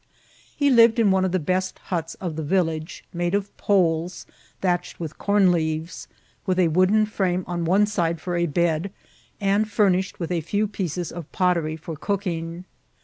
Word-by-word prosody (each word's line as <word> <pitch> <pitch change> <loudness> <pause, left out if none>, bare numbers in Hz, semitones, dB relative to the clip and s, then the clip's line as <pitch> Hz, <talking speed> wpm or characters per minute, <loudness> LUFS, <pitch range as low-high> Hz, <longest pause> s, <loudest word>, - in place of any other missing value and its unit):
He 285 -1 +3
lived 230 -2 +6
in 220 -4 +4
one 190 0 +3
of 185 - -1
the 185 - +2
best 185 +3 -1
huts 165 -3 -4
of 175 -4 -5
the 160 - -3
village^ 160 -1 -1
made 175 +2 0
of 200 0 -3
poles 175 -3 +1 0.3
thatched 175 -2 -1
vrith 160 -3 -7
corn 200 -2 +4
leaves, 160 0 -2 0.4
with 185 -1 +1
a 180 -3 +4
vrooden 185 +6 +3
frame 185 -4 -1
on 175 -1 -3
one 195 +5 +4
side 170 -6 -1
for 175 +2 -3
a 170 0 +1
bed, 170 +3 0 0.5
and 200 +2 +2
fromished 190 -3 +1
with 170 -1 -3
a 170 -2 0
few 205 +7 0
pieces 180 -4 -3
of 170 -3 -8
pottery 170 -4 +1
for 160 +1 -7
cooking. 175 -1 -3
180 Hz, 175 wpm, -24 LUFS, 165-195 Hz, 0.5 s, lived